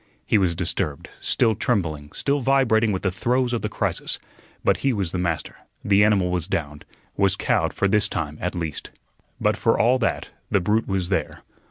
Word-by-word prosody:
He 110 - +3
was 90 -3 +1
disturbed, 80 -4 -2
still 115 -3 +2
trembling, 80 -10 -1
still 145 +1 0
vibrating 120 -5 +3
with 95 - -3
the 95 - +1
throes 125 +6 0
of 120 - -1
the 105 - -2
crisis, - - -1 0.5
but - - +3
he 135 -2 +1
was 95 -6 -1
the 90 - -2
master; 85 -3 -2 0.3
the 100 0 +5
animal 100 -4 +3
was 90 -2 -1
downed, 75 -7 -3 0.3
was - - +2
cowed - - +1
for 100 - 0
this 105 +2 +2
time, 75 -2 -4
at 90 +1 -2
least. 80 -4 -4 0.5
But - - +2
for - - +2
all 125 +3 +4
that, 115 - -1 0.2
the 100 - +3
brute 105 +5 +1
was 95 -3 -1
there. - - -2
95 Hz, 190 wpm, -23 LUFS, 85-115 Hz, 0.5 s, the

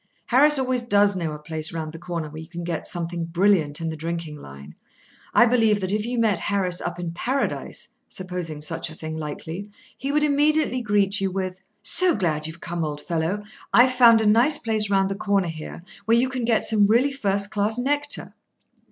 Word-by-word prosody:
Harris 295 +4 +5
always 255 -2 0
does 205 -3 +3
know 165 -4 -2
a 150 - -6
place 155 +1 -6
round 160 -2 -5
the 165 - -10
corner 170 -2 -4
where 155 +1 -9
you 160 - -11
can 175 0 -7
get 170 -2 -4
something 170 -1 -3
brilliant 170 -3 +1
in 165 -1 -3
the 160 - -4
drinking 165 0 -5
line. 70 - -12 0.6
I 240 - +6
believe 225 -3 +3
that 190 -1 -2
if 210 +2 -1
you 245 0 -3
met 220 -5 +2
Harris 190 -3 0
up 175 0 -4
in 175 -1 -4
Paradise 255 +11 -3 0.2
(supposing 180 -5 -6
such 150 - -4
a 160 - -11
thing 160 0 -6
likely), 160 +5 -6 0.3
he 275 +2 -4
would 300 +1 +2
immediately 295 -2 +2
greet 205 -2 +1
you 195 - +1
with: 185 0 -4 0.2
"So 365 -2 +5
glad 155 -5 -1
you've 160 +1 -10
come, 170 0 -3
old 150 -1 -4
fellow; 170 +6 -2 0.3
I've 255 +1 +5
found 235 -3 +6
a - - 0
nice 240 +8 +5
place 220 -3 -1
round 195 -1 +2
the 195 - -2
corner 200 -3 0
here, 160 +1 -8 0.2
where 230 +2 +4
you 255 +2 +2
can 255 -2 -3
get 230 -2 +2
some 210 -3 +4
really 240 +6 +3
first 200 -6 -1
class 210 +2 0
nectar." 290 +3 -2
195 Hz, 205 wpm, -23 LUFS, 165-235 Hz, 0.6 s, I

